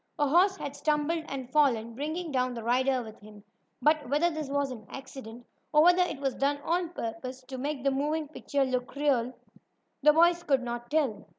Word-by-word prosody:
A 295 -2 +2
horse 370 +6 +4
had 285 -5 -6
stumbled 300 +2 0
and 260 -2 -6
fallen, 235 -7 +2
bringing 310 +6 -4
down 255 -2 0
the 230 - -6
rider 255 +2 +1
with 220 -1 -11
him. 210 0 -14 0.4
But 300 -2 +3
whether 310 +5 +2
this 310 -3 -5
was 280 -1 0
an 220 -5 -9
accident, 245 -3 -9 0.3
or 300 0 +6
whether 355 +1 +6
it 340 -6 -1
was 270 -2 -1
done 280 +1 0
on 345 0 0
purpose, 255 -3 -6
to 260 0 -8
make 280 0 -3
the 275 - +2
moving 300 +3 -1
picture 285 -2 -1
look 255 0 -3
more 290 +1 -3
natural, 250 -2 +1 0.7
the 300 +1 +6
boys 340 +2 +4
could 275 -6 +1
not 240 0 -5
tell. 270 -9 0
275 Hz, 200 wpm, -29 LUFS, 250-305 Hz, 0.7 s, or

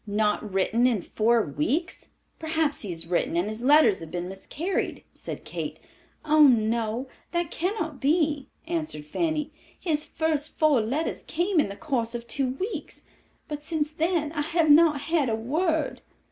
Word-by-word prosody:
"Not 210 0 0
written 220 +6 +2
in 220 -8 0
four 225 +1 +2
weeks? 235 - -2 0.3
Perhaps 315 -2 0
he 205 - -4
has 165 -1 -4
written 170 -1 0
and 175 +4 +1
his 215 +2 -4
letters 260 -6 +5
have 165 - -8
been 175 +1 -4
miscarried," 300 - -3
said - - -7
Kate. - - -5 0.5
"Oh, 305 -1 +7
no, 230 +1 +1 0.3
that 345 -2 -1
cannot 325 -6 -2
be," 295 -1 +1 0.2
answered 315 - -3
Fanny. 305 - -1 0.3
"His 305 -4 0
first 315 -2 -1
four 300 -6 +4
letters 270 +9 -2
came 350 +2 +1
in 290 - +2
the 200 - -6
course 240 -4 -2
of 235 0 -5
two 260 +2 -1
weeks, 335 - -5 0.4
but 295 -1 -5
since 300 -1 -2
then 315 -1 0
I 305 -2 -2
have 320 0 +2
not 305 -2 +6
had 315 -4 +1
a 220 - +1
word." 310 +8 -1
290 Hz, 160 wpm, -26 LUFS, 225-320 Hz, 0.5 s, Oh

